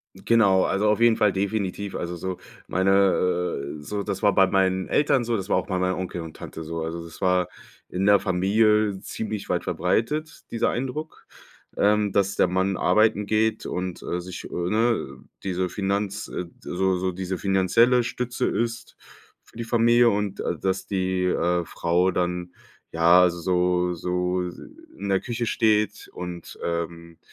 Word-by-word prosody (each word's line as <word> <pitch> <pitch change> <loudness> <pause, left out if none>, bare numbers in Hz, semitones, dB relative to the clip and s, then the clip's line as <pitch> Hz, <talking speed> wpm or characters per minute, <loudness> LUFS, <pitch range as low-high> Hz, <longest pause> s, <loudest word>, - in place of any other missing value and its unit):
Genau, 100 -5 +3
also, 105 +2 +1
auf 105 +1 +2
jeden 115 -1 +5
Fall 105 -2 +3
definitiv. 100 0 -2
Also, 85 0 -4
so 95 +2 -4 0.3
meine 95 +2 +1 0.9
äh, - - -11
so 100 +6 -3
das 95 -1 -4
war 100 -1 +4
bei 95 - +5
meinen 95 -1 +1
Eltern 140 -3 +2
so, 115 0 -1
das 95 -1 -5
war - - +3
auch - - -1
bei 95 -2 -1
meinem 90 0 0
Onkel 90 -2 -4
und 80 -1 -9
Tante 80 - -8
so. 85 +1 -4
Also, 85 +1 -5
das 85 -1 -12
war 90 -1 +2 0.4
in 95 +2 -1
der 100 0 +6
Familie 105 +2 +2
ziemlich 110 -1 -5
weit - - 0
verbreitet, 150 +8 -1
dieser 115 - +1
Eindruck, 135 +6 -5 0.5
ähm, 105 0 +3
dass 100 0 +1
der - - +3
Mann 95 +1 0
arbeiten 105 +3 +3
geht 110 +1 +1
und, 90 -1 -4
äh, 90 - -3
sich, 90 0 -8
äh, - - -8 0.2
ne 110 - 0 0.3
diese 95 -1 -1
Finanz 100 +2 -2
äh, 90 - -4
so 95 +1 0
so 95 0 -1
diese 95 +1 -4
finanzielle 100 +7 +3
Stütze 125 +1 -2
ist, 115 0 -3 0.5
für - - -23
die 115 - -3
Familie 120 +1 +4
und, 100 -2 -2
äh, - - -2
dass 95 0 -2
die, 95 -1 -1
äh, 90 -1 +1
Frau 85 +4 +1
dann, 90 0 -2 0.4
ja, 85 +2 +6
so 90 +1 0
so 90 +1 -1 0.6
in 100 - -4
der 95 -1 +2
Küche 120 -1 -3
steht 110 -2 +1
und, 90 -1 -7
ähm, 85 0 -4
95 Hz, 165 wpm, -24 LUFS, 90-110 Hz, 0.9 s, der